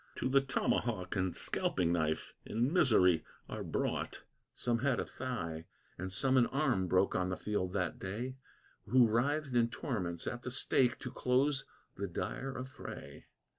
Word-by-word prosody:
To - - -1
the 135 +1 +5
tomahawk 115 -7 0
and 95 -2 0
scalping 85 -2 +1
knife 80 -2 -1
in 120 +7 0
misery 95 - +5 0.2
are - - -5
brought. - - -2 0.3
Some 120 -1 0
had 130 -1 +1
a - - -1
thigh 85 -11 -4 0.3
and 95 +2 -5
some 130 +7 +3
an 120 - +5
arm 130 -10 +1
broke 95 +2 +3
on 90 0 0
the 90 - -2
field 95 -3 -2
that 90 -4 -1
day, 115 +7 -4 0.5
Who 125 -1 +6
writhed 135 +5 +1
in 120 -1 +4
torments 95 - -3
at 120 -1 -3
the 125 - -4
stake 125 -1 +2
to 125 - -5
close 135 +3 +2 0.3
the 100 +1 -2
dire 135 +9 -4
affray. 130 +1 -8
120 Hz, 160 wpm, -34 LUFS, 90-130 Hz, 0.5 s, Who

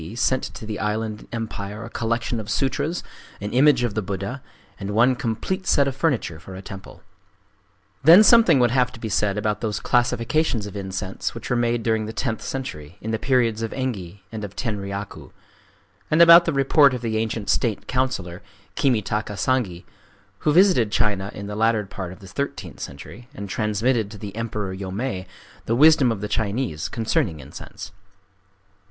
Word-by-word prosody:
D., 80 +8 -8
sent 130 +2 +1
to - - -8
the 105 -1 -5
island 105 +1 -3
empire 110 -2 -5
a - - -8
collection 115 +1 -1
of 105 - -7
sutras, 145 +5 -1 0.4
an 105 +1 -5
image 130 -1 +5
of 120 -4 -1
the 110 - -1
Buddha, 100 +7 -4 0.4
and 100 +1 -4
one 125 +3 +4
complete 130 - -3
set 140 -1 +4
of 135 - -2
furniture 130 - -1
for 95 +3 -10
a 95 - -7
temple. 95 0 -10 1.0
Then 170 +8 +9
something 225 - +6
would 120 -2 +3
have 125 0 +2
to 115 - -11
be 110 - -4
said 105 0 +1
about 105 0 -1
those 110 -2 -2
classifications 120 0 +1
of 105 - -8
incense 95 0 -4
which 115 - -7
were - - +3
made 120 -1 +1
during 110 -1 0
the 110 - -6
tenth 110 0 -2
century, 90 - -6
in 110 - -4
the 110 - -1
periods 120 -4 +1
of 115 - -2
Engi 100 -8 -4
and 110 -1 -6
of 100 -1 -7
Tenryaku,—and 100 -4 -5 0.9
about 170 0 +9
the 165 - +1
report 140 0 +4
of 125 - -5
the 110 -2 -1
ancient 110 -1 -2
state 110 -6 0
councillor, 105 -9 -2 0.3
Kimitaka 105 -5 0
Sangi, 105 -10 0 0.6
who 150 - +1
visited 170 - +4
China 100 -2 0
in 100 - -6
the 105 0 -5
latter 110 -1 +2
part 95 -2 -6
of 95 - -12
the 95 - -11
thirteenth 105 - -5
century, 105 - -9
and 100 - -6
transmitted 105 +2 0
to 105 - -10
the 100 -1 -8
Emperor 105 -4 -3
Yomei 95 0 -4 0.4
the 115 - +2
wisdom 145 -2 +6
of 105 -3 -4
the 105 - -2
Chinese 105 - -2
concerning 110 -7 -1
incense. - - -10
110 Hz, 175 wpm, -23 LUFS, 100-125 Hz, 1.0 s, Then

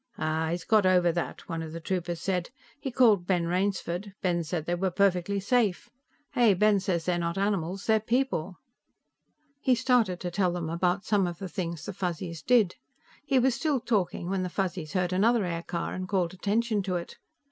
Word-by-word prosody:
"Aah, 160 +1 -1
he's 170 +1 -2
got 215 -4 +4
over 180 -2 +4
that," 170 0 -4
one 165 -1 -3
of 160 -1 -7
the 165 - -5
troopers 175 0 -3
said. 180 -3 -1 0.3
"He 275 - -4
called 220 -8 +4
Ben 175 -3 +2
Rainsford; 190 +1 -2
Ben 175 -2 +1
said 160 -1 -3
they 175 - -1
were 185 +2 0
perfectly 195 +1 +1
safe. 205 -2 +1 0.4
Hey, 235 -6 +4
Ben 210 +1 +4
says 180 -4 -1
they're 175 -1 +1
not 170 +1 -2
animals; 195 -2 -1
they're 220 -1 +4
people." 220 -7 -1 1.0
He 260 -3 +3
started 230 -7 +2
to 180 - -3
tell 180 -1 +1
them 165 -2 -3
about 180 +3 0
some 200 -4 +2
of 175 -1 -5
the 195 - -5
things 170 -5 -4
the 205 - -5
Fuzzies 175 -3 -4
did. 225 -7 +3 0.5
He 270 - +3
was 255 0 +3
still 290 +2 0
talking 195 -8 -1
when 190 0 -1
the 180 - -2
Fuzzies 180 -4 -3
heard 180 -1 0
another 220 +3 +3
aircar 170 0 -3
and 185 0 -5
called 185 -4 0
attention 210 +3 0
to 185 -1 -2
it. 170 -1 -6
185 Hz, 190 wpm, -28 LUFS, 175-205 Hz, 1.0 s, got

